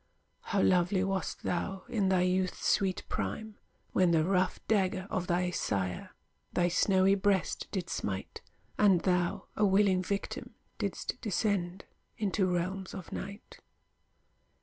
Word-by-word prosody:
How 200 Hz, -3 st, 0 dB
lovely 185 Hz, +1 st, +3 dB
wast 195 Hz, -2 st, -2 dB
thou, 185 Hz, +2 st, -2 dB
in 205 Hz, -5 st, +1 dB
thy 185 Hz, -1 st, +3 dB
youth's 185 Hz, 0 st, 0 dB
sweet 195 Hz, -3 st, +2 dB
prime, 220 Hz, -1 st, -4 dB, 0.3 s
When 185 Hz, -2 st, +4 dB
the 165 Hz, -2 st, +4 dB
rough 185 Hz, 0 st, +1 dB
dagger 190 Hz, -3 st, +1 dB
of 180 Hz, -1 st, -1 dB
thy 180 Hz, +1 st, +1 dB
sire 95 Hz, -, -2 dB, 0.4 s
Thy 175 Hz, 0 st, +2 dB
snowy 190 Hz, +2 st, +4 dB
breast 200 Hz, -2 st, +1 dB
did 185 Hz, -4 st, -2 dB
smite, 95 Hz, -2 st, -4 dB, 0.4 s
And 195 Hz, -5 st, +5 dB
thou, 180 Hz, -2 st, 0 dB
a 215 Hz, -, +1 dB
willing 195 Hz, -1 st, +4 dB
victim, 200 Hz, +2 st, -4 dB, 0.2 s
didst -, -, -3 dB
descend 195 Hz, -4 st, -1 dB, 0.3 s
Into 200 Hz, -2 st, +1 dB
realms 185 Hz, +2 st, -2 dB
of 190 Hz, -3 st, -8 dB
night! 200 Hz, +2 st, -7 dB
185 Hz, 130 wpm, -31 LUFS, 180-195 Hz, 0.4 s, And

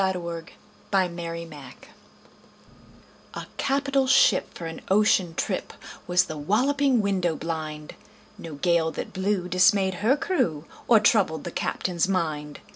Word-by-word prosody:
Y 190 Hz, 0 st, +2 dB
Z -, -, -4 dB
A -, -, -4 dB
Nautical 165 Hz, -1 st, -6 dB, 0.4 s
Ballad 170 Hz, -7 st, -3 dB, 1.6 s
A -, -, -6 dB
CAPITAL 275 Hz, -1 st, +1 dB
ship 255 Hz, -6 st, +4 dB
for 170 Hz, -, -7 dB
an 165 Hz, 0 st, -7 dB
ocean 190 Hz, -4 st, +3 dB
trip 185 Hz, -, -3 dB, 0.3 s
Was 180 Hz, +1 st, +4 dB
The 155 Hz, -4 st, -7 dB
Walloping 255 Hz, -, +2 dB
Window 185 Hz, -5 st, 0 dB
blind 155 Hz, -2 st, -5 dB, 0.4 s
No 160 Hz, -3 st, -9 dB
gale 170 Hz, +1 st, +1 dB
that -, -, -6 dB
blew 190 Hz, -1 st, -1 dB
dismayed 190 Hz, +2 st, +3 dB
her 250 Hz, +7 st, +3 dB
crew 170 Hz, -, -1 dB, 0.2 s
Or 230 Hz, -2 st, +6 dB
troubled 200 Hz, -7 st, +2 dB
the 175 Hz, -, -5 dB
captain's 175 Hz, 0 st, -1 dB
mind. 155 Hz, -6 st, -2 dB
180 Hz, 135 wpm, -25 LUFS, 165-210 Hz, 1.6 s, Or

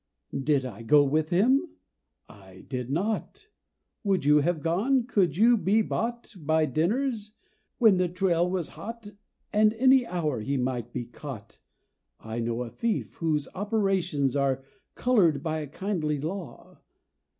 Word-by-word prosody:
"Did 135 Hz, -1 st, +1 dB
I 115 Hz, -4 st, -7 dB
go 145 Hz, +6 st, +5 dB
with 155 Hz, +3 st, 0 dB
him?" 225 Hz, -, +2 dB, 0.5 s
I 95 Hz, -2 st, -15 dB
did 125 Hz, -2 st, -4 dB
not. 215 Hz, -, -3 dB, 0.5 s
Would 195 Hz, -7 st, +1 dB
you 150 Hz, +1 st, +6 dB
have 160 Hz, 0 st, 0 dB
gone? 230 Hz, +10 st, +1 dB
Could 195 Hz, -, +1 dB
you 235 Hz, +4 st, +6 dB
be 210 Hz, +2 st, +2 dB
bought 235 Hz, +2 st, -3 dB
By 155 Hz, 0 st, +2 dB
dinners 210 Hz, -, -1 dB, 0.4 s
when 220 Hz, -6 st, +5 dB
the 180 Hz, -1 st, +1 dB
trail 180 Hz, -1 st, +1 dB
was 180 Hz, -3 st, -2 dB
hot 225 Hz, -2 st, -9 dB, 0.4 s
And 215 Hz, 0 st, +4 dB
any 260 Hz, +1 st, +4 dB
hour 155 Hz, -, -2 dB
he 140 Hz, +5 st, -1 dB
might 125 Hz, -2 st, -2 dB
be 120 Hz, -1 st, -4 dB
caught? 120 Hz, -2 st, -10 dB, 0.6 s
I 110 Hz, +1 st, -6 dB
know 115 Hz, +1 st, -2 dB
a 115 Hz, -, -8 dB
thief, 230 Hz, -2 st, -2 dB
whose 155 Hz, -3 st, 0 dB
operations 190 Hz, -, 0 dB
Are 135 Hz, -1 st, 0 dB, 0.3 s
colored 180 Hz, -, +2 dB
by 160 Hz, -1 st, -1 dB
a 150 Hz, -, -5 dB
kindly 155 Hz, -2 st, -2 dB
law. 170 Hz, +4 st, -7 dB
170 Hz, 145 wpm, -27 LUFS, 140-210 Hz, 0.6 s, you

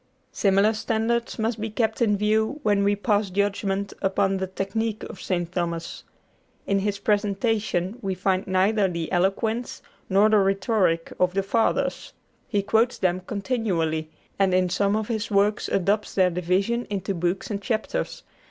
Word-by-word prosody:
Similar 200 Hz, +2 st, +3 dB
standards 225 Hz, +2 st, -1 dB
must 225 Hz, -1 st, -1 dB
be 220 Hz, -, -2 dB
kept 220 Hz, +1 st, -1 dB
in 210 Hz, -3 st, +3 dB
view 220 Hz, +6 st, +1 dB
when 205 Hz, -3 st, +2 dB
we 205 Hz, +1 st, +3 dB
pass 205 Hz, -1 st, +1 dB
judgment 200 Hz, 0 st, -1 dB
upon 195 Hz, 0 st, +1 dB
the 190 Hz, 0 st, -2 dB
technique 210 Hz, +4 st, -3 dB
of 190 Hz, -, -8 dB
St. 175 Hz, -2 st, -2 dB
Thomas. 170 Hz, -2 st, -3 dB, 0.6 s
In 200 Hz, 0 st, +1 dB
his 200 Hz, +1 st, -1 dB
presentation 205 Hz, 0 st, 0 dB
we 195 Hz, -2 st, -2 dB
find 190 Hz, +1 st, 0 dB
neither 195 Hz, +2 st, +2 dB
the 170 Hz, -3 st, -4 dB
eloquence 220 Hz, +6 st, 0 dB, 0.3 s
nor 200 Hz, +2 st, +5 dB
the 215 Hz, -1 st, +4 dB
rhetoric 195 Hz, -3 st, +1 dB
of 180 Hz, 0 st, +2 dB
the 195 Hz, -, +1 dB
Fathers. 225 Hz, +4 st, 0 dB, 0.3 s
He 205 Hz, -3 st, 0 dB
quotes 225 Hz, +4 st, +2 dB
them 185 Hz, -1 st, +1 dB
continually, 185 Hz, -8 st, -1 dB, 0.3 s
and 190 Hz, -2 st, +3 dB
in 185 Hz, -1 st, +2 dB
some 200 Hz, +2 st, +1 dB
of 215 Hz, -1 st, -1 dB
his 220 Hz, -2 st, -2 dB
works 205 Hz, 0 st, +2 dB
adopts 200 Hz, +3 st, 0 dB
their 185 Hz, -2 st, +4 dB
division 185 Hz, +7 st, 0 dB
into 195 Hz, -1 st, -2 dB
books 180 Hz, +4 st, -2 dB
and 200 Hz, -1 st, -3 dB
chapters. 220 Hz, -1 st, -2 dB
200 Hz, 155 wpm, -25 LUFS, 190-220 Hz, 0.6 s, nor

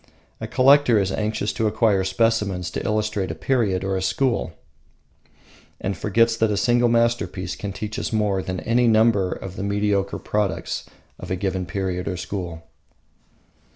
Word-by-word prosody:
A -, -, -5 dB
collector 135 Hz, -2 st, +5 dB
is 95 Hz, -2 st, +1 dB
anxious 105 Hz, 0 st, -1 dB
to 110 Hz, -2 st, 0 dB
acquire 105 Hz, -2 st, +2 dB
specimens 95 Hz, -2 st, 0 dB
to -, -, -4 dB
illustrate 105 Hz, -3 st, -1 dB
a -, -, -4 dB
period 105 Hz, -8 st, 0 dB
or 95 Hz, 0 st, -1 dB
a 95 Hz, -, -1 dB
school, 120 Hz, -3 st, 0 dB, 1.3 s
and 95 Hz, +1 st, -2 dB
forgets 115 Hz, +6 st, +2 dB
that 110 Hz, -1 st, +2 dB
a 105 Hz, -, 0 dB
single 120 Hz, +1 st, +3 dB
masterpiece 115 Hz, -6 st, 0 dB
can 100 Hz, -, -5 dB
teach 105 Hz, +4 st, -5 dB
us -, -, -3 dB
more 105 Hz, -3 st, +1 dB
than 95 Hz, 0 st, -4 dB
any 120 Hz, +1 st, +2 dB
number 110 Hz, -4 st, +3 dB
of 95 Hz, 0 st, -7 dB
the -, -, -3 dB
mediocre 100 Hz, -1 st, 0 dB
products 105 Hz, -2 st, -2 dB, 0.3 s
of -, -, -8 dB
a 95 Hz, -, 0 dB
given 95 Hz, -1 st, -2 dB
period 90 Hz, 0 st, -3 dB
or 90 Hz, -, -2 dB
school. 90 Hz, -3 st, -5 dB
105 Hz, 160 wpm, -23 LUFS, 95-115 Hz, 1.3 s, collector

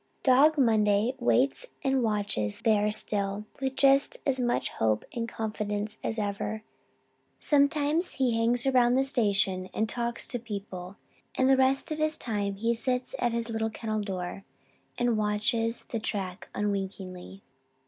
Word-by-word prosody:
Dog 285 Hz, +4 st, +5 dB
Monday 220 Hz, -2 st, +3 dB
waits 265 Hz, -, +2 dB, 0.2 s
and 270 Hz, -1 st, +2 dB
watches 205 Hz, -, -1 dB
there 210 Hz, -2 st, +3 dB
still, 205 Hz, -1 st, -2 dB
with 265 Hz, 0 st, -2 dB
just 275 Hz, -, +4 dB
as 265 Hz, -2 st, +1 dB
much 240 Hz, -1 st, 0 dB
hope 110 Hz, -1 st, 0 dB
and 230 Hz, -1 st, -3 dB
confidence 210 Hz, -1 st, -3 dB
as 225 Hz, -, -2 dB
ever. 210 Hz, +1 st, -3 dB, 0.7 s
Sometimes 295 Hz, +3 st, +2 dB
he 255 Hz, -4 st, +1 dB
hangs 235 Hz, +2 st, +2 dB
around 250 Hz, -2 st, +4 dB
the 265 Hz, -, +3 dB
station 200 Hz, -8 st, +1 dB
house -, -, -14 dB
and 220 Hz, -, +1 dB
talks 235 Hz, +1 st, -2 dB
to 245 Hz, -, -2 dB
people 200 Hz, -5 st, -7 dB, 0.4 s
and 260 Hz, -, +3 dB
the 270 Hz, -, +6 dB
rest 265 Hz, +3 st, +2 dB
of 310 Hz, -, -2 dB
his 310 Hz, 0 st, +2 dB
time 205 Hz, -4 st, -2 dB
he 230 Hz, +4 st, 0 dB
sits 250 Hz, +1 st, -2 dB
at 240 Hz, -, +1 dB
his 230 Hz, 0 st, 0 dB
little 225 Hz, -1 st, -1 dB
kennel 220 Hz, -1 st, -3 dB
door 190 Hz, -1 st, -5 dB, 0.5 s
and 240 Hz, -2 st, +1 dB
watches 215 Hz, +2 st, 0 dB
the 230 Hz, -, -2 dB
track 195 Hz, -3 st, -4 dB
unwinkingly. 195 Hz, -2 st, -4 dB
225 Hz, 150 wpm, -28 LUFS, 205-255 Hz, 0.7 s, the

